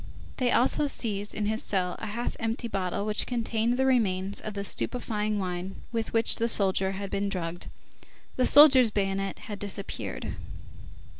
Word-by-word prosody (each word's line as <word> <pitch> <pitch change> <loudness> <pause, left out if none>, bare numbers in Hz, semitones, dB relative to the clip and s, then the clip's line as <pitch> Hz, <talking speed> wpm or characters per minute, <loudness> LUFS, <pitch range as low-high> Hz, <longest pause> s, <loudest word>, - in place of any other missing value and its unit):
They 250 -2 +1
also 280 +4 +3
seized 210 -6 -1
in 210 - -2
his 220 +1 0
cell 180 -3 -1
a 220 - -5
half 235 +4 -4
empty 230 +1 -2
bottle 195 -1 -2
which 215 0 0
contained 235 0 -1
the 265 - +2
remains 200 -6 +1
of 215 -1 -7
the 200 - -3
stupefying 215 -1 -2
wine 185 0 -4 0.2
with 225 -2 -3
which 225 0 +2
the 230 0 0
soldier 195 -2 +3
had 195 0 -6
been 200 0 -1
drugged. 175 -3 -3 0.7
The 255 - +4
soldier's 270 -5 +8
bayonet 195 -1 -2
had 210 -5 -8
disappeared. 200 -1 -5
210 Hz, 160 wpm, -27 LUFS, 195-235 Hz, 0.7 s, soldier's